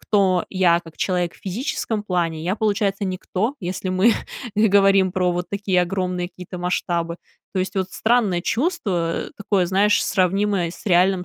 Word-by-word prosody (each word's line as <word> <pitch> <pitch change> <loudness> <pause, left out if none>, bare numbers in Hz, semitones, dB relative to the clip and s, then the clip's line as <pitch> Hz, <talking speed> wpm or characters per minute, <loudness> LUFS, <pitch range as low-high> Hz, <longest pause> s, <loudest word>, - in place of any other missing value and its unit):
кто 190 -4 +2
я, 175 -3 +3
как 165 -2 -15
человек 180 -2 -1
в - - -18
физическом 215 +1 -3
плане, 170 -5 -1
я, 185 +5 -1
получается, 205 -2 0
никто, 190 +5 -2
если 185 +1 -4
мы 190 +5 +4 0.4
говорим 195 -3 +4
про 180 -1 +1
вот 175 0 -3
такие 200 -3 +1
огромные 180 -1 -2
какие-то 180 0 -9
масштабы. 170 -1 -1 0.4
То 190 - -2
есть 185 +2 -3
вот 190 -1 -1
странное 220 -6 +1
чувство, 195 - -1
такое, 200 -3 +1
знаешь, 200 +3 +3
сравнимое 195 -1 +1
с 175 - -13
реальным 180 0 +3
185 Hz, 155 wpm, -22 LUFS, 180-205 Hz, 0.4 s, мы